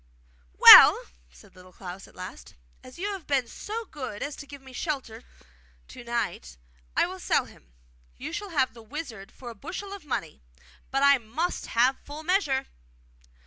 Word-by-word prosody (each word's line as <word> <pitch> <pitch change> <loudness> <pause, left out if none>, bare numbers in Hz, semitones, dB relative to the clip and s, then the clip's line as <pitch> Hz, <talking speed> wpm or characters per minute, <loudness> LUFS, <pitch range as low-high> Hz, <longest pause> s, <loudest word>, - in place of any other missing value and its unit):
'Well!' - - +11 0.3
said - - -20
Little 185 0 -17
Klaus 185 +1 -10
at - - -21
last, 185 0 -10 0.3
'as 255 - -14
you 400 +4 -3
have 380 -6 -9
been 275 -3 +1
so 445 - -6
good 260 - -7
as 285 0 -5
to 285 - -10
give 280 0 -11
me 265 -1 -15
shelter 255 -6 -5 0.7
to - - -11
night, 215 - -4 0.4
I - - +4
will - - -8
sell - - +1
him. 65 - -19 0.5
You 300 +5 -7
shall 410 +2 -5
have 280 -7 0
the 230 - -13
wizard 220 -5 -8
for 245 -2 -10
a - - -13
bushel 390 - -7
of 400 -4 -10
money, 165 - -5 0.5
but 270 +1 0
I 280 -1 +6
must 265 +11 -4
have 250 +3 +2
full 295 +2 -10
measure. 310 -7 0
265 Hz, 175 wpm, -26 LUFS, 220-310 Hz, 0.7 s, Well